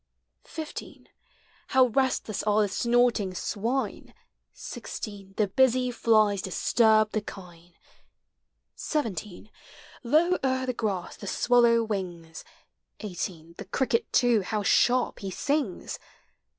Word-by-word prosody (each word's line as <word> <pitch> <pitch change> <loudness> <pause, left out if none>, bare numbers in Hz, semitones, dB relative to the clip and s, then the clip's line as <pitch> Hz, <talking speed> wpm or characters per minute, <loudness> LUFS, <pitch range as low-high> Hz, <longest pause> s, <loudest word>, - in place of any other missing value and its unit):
15 315 -1 -8 0.6
How 260 -1 +5
restless 255 -4 0
are 215 0 +2
the - - +1
snorting 235 -2 +1
swine! 230 +9 -3 0.4
16 200 -3 -8
The 215 - +3
busy 255 +2 +2
flies 215 -4 +3
disturb 215 +3 +3
the 215 - -1
kine, 175 -4 -12 1.0
17 210 - -4 0.5
Low 315 +8 +2
o'er 260 -1 0
the 255 - -1
grass 200 -6 -3
the 200 - -9
swallow 235 +1 +3
wings, 175 -6 -5 0.6
18 175 -4 -6
The 200 - -6
cricket, 240 +4 -1
too, 240 -3 +3
how 210 +2 -2
sharp 245 +4 +2
he 195 - -5
sings! 275 - -2
215 Hz, 110 wpm, -27 LUFS, 195-250 Hz, 1.0 s, How